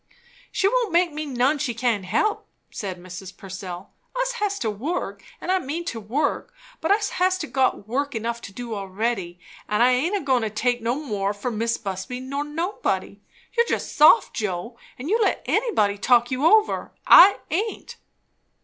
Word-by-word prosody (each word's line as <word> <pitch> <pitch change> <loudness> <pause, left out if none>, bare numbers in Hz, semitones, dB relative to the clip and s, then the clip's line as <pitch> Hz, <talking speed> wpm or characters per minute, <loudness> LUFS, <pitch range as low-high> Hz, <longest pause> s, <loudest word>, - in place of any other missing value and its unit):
"She 390 - +2
won't 475 -1 +1
make 345 -1 +2
me 305 0 -4
none 270 +3 +1
she 240 -3 -2
can't 230 -5 0
help," 410 - 0 0.2
said 190 -3 -5
Mrs. 180 +1 -10
Purcell. 185 -1 -8 0.3
"Us - - +1
has 415 -4 -2
to 225 - -1
work, 210 - -4 0.2
and 365 - -2
I 375 - +3
mean 335 +2 -4
to 230 -8 -4
work; 245 - -2 0.2
but 320 - -2
us 415 +1 +3
has 370 0 +3
got 265 - 0
work 280 +3 -2
enough 235 +1 -3
to - - -9
do 235 +2 -6
already, 195 -2 -3 0.3
and 210 +3 +3
I 250 - +5
aint 320 +11 +1
a - - -4
goin' 260 -4 +2
to 220 - -1
take 240 +3 0
no 235 +2 0
more, 210 -9 -2
for 225 +5 -3
Mis' 230 +1 -1
Busby 195 +5 -5
nor 275 +3 -3
nobody. 330 +7 -3 0.3
You're 470 0 +3
just - - -2
soft, 305 +9 +6
Joe, 210 +1 -3 0.2
and 255 - -7
you 440 +6 +2
let - - +1
anybody 215 - +1
talk 240 +3 +3
you 260 +5 +2
over. 435 +3 +3
I 395 +3 +9
aint." 415 +7 -3
250 Hz, 180 wpm, -24 LUFS, 210-335 Hz, 0.3 s, I